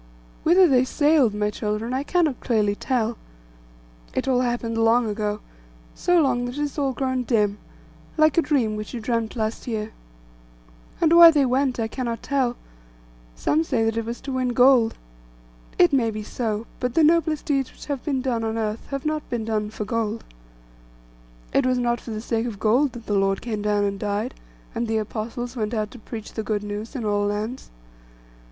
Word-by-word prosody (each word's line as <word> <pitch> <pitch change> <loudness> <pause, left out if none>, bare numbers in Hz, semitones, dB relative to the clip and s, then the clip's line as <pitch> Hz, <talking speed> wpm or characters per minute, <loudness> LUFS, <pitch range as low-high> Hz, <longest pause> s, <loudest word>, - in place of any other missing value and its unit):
Whither 360 +3 +6
they 255 -4 +4
sailed, 290 -5 +3
my 210 0 0
children, 215 +3 -3
I 260 - 0
cannot 310 -3 +1
clearly 215 -4 +1
tell. 230 0 -1 1.0
It - - -1
all 255 -2 +3
happened 240 -2 -1
long 225 +1 +3
ago; 210 0 -2 0.5
so 355 -1 +2
long 250 -5 +2
that 245 +3 -5
it - - -2
has 295 0 -3
all 275 -2 +1
grown 260 0 -1
dim, 210 -4 +1 0.6
like 310 0 +4
a 335 - +5
dream 270 -8 +1
which 215 +4 -6
you - - -3
dreamt 230 0 -2
last 220 +1 -3
year. 220 -2 -3 1.1
And 330 -1 +4
why 340 0 +11
they 295 -4 +3
went 255 0 +1
I 225 - 0
cannot 235 0 -4
tell: 260 -3 0 0.8
some 310 - +1
say 255 -8 0
that 225 0 0
it 230 -1 -2
was 235 +1 -5
to 275 - -6
win 255 -1 0
gold. 250 -2 +5 0.8
It 175 - +5
may 240 -4 +3
be 215 -1 -5
so; 220 0 -3
but 250 -1 -2
the 325 - +5
noblest 320 -1 +2
deeds 275 -5 0
which - - -13
have 285 -3 -4
been 270 -4 -1
done 240 -4 -1
on 225 0 -2
earth 215 0 -3
have 275 0 -5
not 310 0 -2
been 235 -3 -2
done 215 -2 -1
for 215 0 -5
gold. 225 0 -2 1.3
It - - +3
was 255 0 +2
not 240 -1 0
for - - -10
the 215 -1 -4
sake 230 0 -1
of 220 -4 -5
gold 250 +5 +2
that 235 -2 -10
the 210 - -2
Lord 195 -1 +2
came 215 -3 -4
down 205 0 +1
and 200 -1 -1
died, 205 +1 -2 0.4
and 235 - -2
the 220 0 0
Apostles 225 +3 -4
went 220 -1 -2
out 215 -1 -2
to 250 - -11
preach 220 0 -8
the 220 - -3
good 210 -1 -2
news 210 +5 -6
in 240 -4 -3
all 205 -1 +1
lands. 215 +5 -4
235 Hz, 195 wpm, -24 LUFS, 215-265 Hz, 1.3 s, why